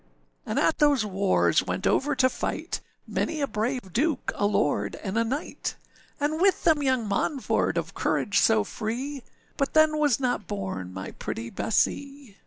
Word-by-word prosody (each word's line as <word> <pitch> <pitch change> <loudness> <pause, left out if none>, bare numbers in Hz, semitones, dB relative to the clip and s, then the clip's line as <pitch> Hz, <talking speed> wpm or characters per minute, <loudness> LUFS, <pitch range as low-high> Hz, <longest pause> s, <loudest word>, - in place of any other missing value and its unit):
âAnd - - -2
at - - +2
those 285 -7 +4
wars 195 -1 +2
went - - -3
over 290 +1 +2
to 260 - +4
fight, - - -3 0.2
Many 320 -1 -2
a 285 - +2
brave 220 -3 -3
duke, 285 +2 0
a 205 - +1
lord, 125 - 0
and 190 +1 -3
a 230 - +3
knight, 270 +7 -3 0.4
And 305 +3 0
with 390 0 +3
them 315 -3 +4
young 260 -5 +1
Monford 255 +7 0
of - - -2
courage 205 -1 +1
so 220 -1 +4
free; 250 +7 -4 0.4
But 275 +1 -1
then 310 -1 +5
was 290 -6 +3
not 245 -5 -1
born 190 - -4
my 95 +1 -6
pretty 115 +1 -5
Bessee. 275 0 -1
250 Hz, 165 wpm, -26 LUFS, 205-290 Hz, 0.4 s, then